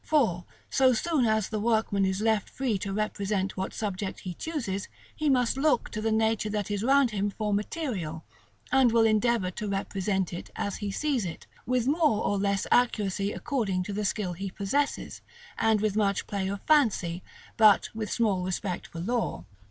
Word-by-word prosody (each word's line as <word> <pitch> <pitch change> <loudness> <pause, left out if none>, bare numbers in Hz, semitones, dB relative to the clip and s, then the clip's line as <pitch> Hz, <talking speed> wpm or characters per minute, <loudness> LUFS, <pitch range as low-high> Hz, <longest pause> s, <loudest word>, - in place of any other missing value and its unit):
For, 220 - +1 0.3
so 260 -1 +4
soon 275 +2 +1
as 220 -2 +1
the 215 - -2
workman 220 -3 +1
is 190 +1 -1
left 220 -2 +1
free 245 -7 -1
to 195 +1 -4
represent 200 -1 -1
what 190 0 -3
subjects 200 -2 -4
he 180 - -4
chooses, 230 - -3 0.3
he 305 -1 0
must 250 -1 +2
look 275 -3 +2
to 215 - -4
the 220 0 0
nature 220 -1 +1
that 210 -1 -2
is 205 -1 -1
round 270 0 +4
him 205 -1 0
for 210 0 -2
material, 200 - -3 0.5
and 265 -3 +5
will 225 0 +4
endeavor 220 -3 +2
to 210 +3 -5
represent 195 -1 -1
it 175 - -6
as 200 - -3
he 205 - -4
sees 270 +2 0
it, 170 -3 -6 0.2
with 250 -1 +1
more 290 -6 +2
or 205 - +1
less 200 -1 0
accuracy 205 -5 +2
according 210 -11 -1
to 200 - -5
the 210 +1 -2
skill 195 -2 -1
he 195 +3 -5
possesses, 210 +10 -2 0.3
and 220 -2 +2
with 215 -2 0
much 200 -3 +1
play 195 -2 -2
of 200 +1 -4
fancy, 210 - +2 0.3
but 215 -3 +5
with 220 -1 -4
small 210 -6 +1
respect 185 0 -3
for 165 - -7
law. 235 +5 -2
210 Hz, 185 wpm, -28 LUFS, 195-235 Hz, 0.5 s, and